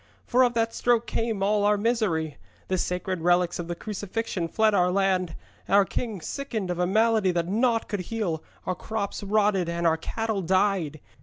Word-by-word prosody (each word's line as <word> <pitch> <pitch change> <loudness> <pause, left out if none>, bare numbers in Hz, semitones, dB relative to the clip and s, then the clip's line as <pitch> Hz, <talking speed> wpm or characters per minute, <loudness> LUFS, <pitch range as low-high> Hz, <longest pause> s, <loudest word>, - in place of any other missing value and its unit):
For 250 +1 +3
of 245 -2 +3
that 230 0 +1
stroke 240 -1 +2
came 225 -3 -2
all 205 +1 +2
our 210 0 +3
misery. 200 - 0 0.3
The 185 -1 +1
sacred 180 0 -2
relics 175 +1 +2
of 170 - -4
the 175 - -3
Crucifixion 205 -2 -3
fled 220 +4 +2
our 180 -2 +3
land, 185 -3 +1 0.3
our 200 0 +5
king 210 0 -4
sickened 220 - -4
of 175 - -3
a 180 - +2
malady 220 0 +3
that 170 -1 0
naught 225 +3 +1
could 205 - -3
heal, 195 -9 -2 0.2
our 185 - 0
crops 210 +2 -4
rotted, 200 -3 +1
and 170 0 -2
our 165 -1 +4
cattle 220 +4 -2
died. 185 -4 +1
200 Hz, 180 wpm, -26 LUFS, 180-220 Hz, 0.3 s, our